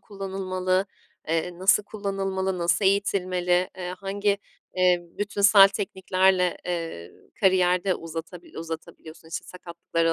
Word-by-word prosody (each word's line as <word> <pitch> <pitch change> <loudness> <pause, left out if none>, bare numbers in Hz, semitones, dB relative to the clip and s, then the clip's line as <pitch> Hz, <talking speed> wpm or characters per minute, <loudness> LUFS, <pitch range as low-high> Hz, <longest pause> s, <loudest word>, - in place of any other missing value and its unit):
kullanılmalı, 190 -1 -2 0.4
eee, 165 +2 -1
nasıl 195 +2 +4
kullanılmalı, 195 -3 -3
nasıl 175 +3 +1
eğitilmeli, 185 -2 +1
eee, 180 0 -4
hangi, 200 +1 -1 0.4
eee, 180 -1 +4 0.2
bütünsel 200 -1 +6
tekniklerle, 190 -2 +1
eee, 165 - -4 0.3
kariyer 185 -2 +3
de 185 -2 +2
uzatabil 165 +2 -8
uzatabiliyorsun, 160 0 -8
işte, 165 - -5
sakatlıkları 170 -2 -2
185 Hz, 105 wpm, -25 LUFS, 175-195 Hz, 0.4 s, bütünsel